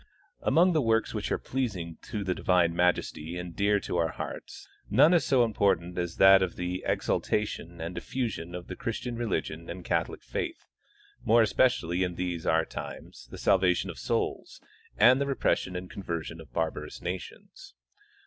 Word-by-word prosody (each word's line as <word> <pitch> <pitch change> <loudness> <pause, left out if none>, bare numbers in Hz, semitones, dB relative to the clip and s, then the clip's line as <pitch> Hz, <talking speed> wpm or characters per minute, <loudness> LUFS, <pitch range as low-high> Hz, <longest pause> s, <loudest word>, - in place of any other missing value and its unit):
Among 175 +2 +4
the 155 - +3
works 115 -2 +1
which - - -3
are - - +2
pleasing 95 -11 -3
to 105 -2 -3
the 95 -1 0
divine 90 -2 +2
Majesty 90 -1 0
and 90 -1 -6
dear 100 0 +2
to - - -3
our 85 -1 +2
hearts, - - -7 0.2
none 145 - +6
is 175 - +4
so 130 -3 +4
important 100 -6 +1
as 85 -1 -3
that 95 0 +8
of 95 -2 -1
the 90 +1 -3
ex - - -1
altation 85 -5 -1
and 85 +2 -4
diffusion 100 -8 -4
of 90 0 -6
the 90 - -7
Christian 120 +2 -4
religion 90 -8 -3
and 85 0 -7
Catholic - - -1
faith, - - -4 0.6
more 115 +1 +5
especially 105 -6 +2
in 90 -2 -1
these 90 -2 -3
our 80 0 +3
times, - - -8
the - - -9
salvation 90 -2 +2
of - - -12
souls, - - -2 0.4
and 130 +3 +6
the 140 - 0
repression 110 -8 0
and 90 +1 -4
conversion 85 -3 -5
of 75 -6 -15
barbarous 80 +5 -3
nations. 90 -6 -7
90 Hz, 170 wpm, -28 LUFS, 85-115 Hz, 0.6 s, that